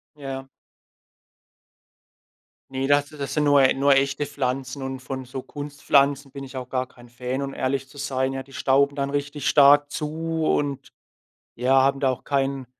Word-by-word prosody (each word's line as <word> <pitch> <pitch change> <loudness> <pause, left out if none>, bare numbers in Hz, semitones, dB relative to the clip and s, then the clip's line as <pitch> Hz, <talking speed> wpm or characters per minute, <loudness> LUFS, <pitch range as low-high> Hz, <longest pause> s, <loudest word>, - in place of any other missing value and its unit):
Ja. 135 -2 -6 2.2
Ne, 135 0 -2
das 145 0 +3
das 145 -2 -6
sind 150 - +2
nur 145 -1 +5
e 130 - +5
nur 140 +1 +4
echte 140 +1 +1
Pflanzen 135 -1 -3
und 130 0 -4
von 130 0 -6
so 130 +1 -7
Kunstpflanzen 140 -1 0
bin 140 -1 -8
ich 130 0 -8
auch 125 -1 -5
gar 130 0 -2
kein 120 -1 -17
Fan, 125 +3 -4
um 135 - -5
ehrlich 135 0 -2
zu 140 +1 -14
sein. 135 -1 -1
Ja, 135 - -4
die 135 +1 -15
stauben 140 +2 +2
dann 140 0 -2
richtig 145 0 -3
stark 145 0 +6
zu 160 +1 -2
und, 140 -2 -1 0.7
ja, 130 +3 +3
haben 135 0 +2
da 135 - +2
auch 130 - -5
keinen 135 -2 -1
135 Hz, 175 wpm, -24 LUFS, 130-145 Hz, 2.2 s, stark